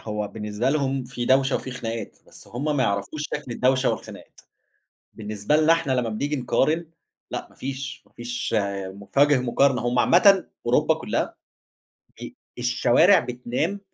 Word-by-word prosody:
هو 105 -1 -4
بالنسبة 105 +4 -2
لهم 135 -3 0
في 120 0 -5
دوشة 135 +1 +3
وفي 130 - -6
خناقات 115 -4 -5
بس - - -16
هُم 145 +5 -2
ما 130 - +2
يعرَفوش 100 +8 -2
شكل 135 -5 -5
الدوشة 130 +1 +2
والخناقات. - - -8 0.7
بالنسبة 105 +5 -2
لنا 155 +2 +5
إحنا 165 -5 -1
لما 125 -3 0
بنيجي 145 +7 -2
نقارن، 155 +6 0 0.4
لأ - - -4
ما - - -22
فيش، 135 +1 -6
ما - - -28
فيش 120 -1 -4 0.3
مف 100 +6 -11
وجْه 145 -1 +5
مقارنة، 125 0 +2
هُم 120 0 0
عامةً 190 +5 +5 0.2
أوروبا - - +3
كلها - - -2 0.9
ب - - -7 0.3
الشوارع 125 +9 +4
بتنام 125 +10 -3
130 Hz, 150 wpm, -24 LUFS, 120-145 Hz, 0.9 s, لنا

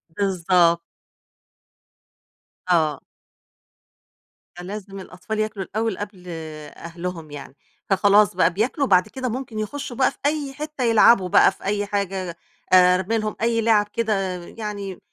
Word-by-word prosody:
بالضبط. 175 -3 +2 1.9
آه. 155 -5 +2 1.6
فلازم 195 +2 -8
الأطفال 190 +4 -6
ياكلوا 215 -3 -2
الأول 220 0 -2
قبل 200 -3 -8 0.5
أهلهم 170 -2 -7
يعني، 140 -1 -9 0.3
فخلاص 200 0 +4
بقى 175 -1 +3
بياكلوا 255 - 0
وبعد 185 -4 +4
كده 260 -2 -4
ممكن 235 -2 -5
يخشّوا 245 +3 -5
بقى 265 - +3
في - - -21
أي 290 -2 -1
حتّة 300 -1 -5
يلعبوا 225 -4 +5
بقى - - +6
في - - -18
أي 205 +1 -1
حاجة، 190 -4 -3 0.4
آآ 180 0 +7
أرمي 195 +5 -1
لهم 215 -1 -3
أي 230 0 +1
لعب 215 -2 +3
كده، 225 -2 0 0.3
يعني 205 -4 -6
205 Hz, 125 wpm, -22 LUFS, 180-225 Hz, 1.9 s, آآ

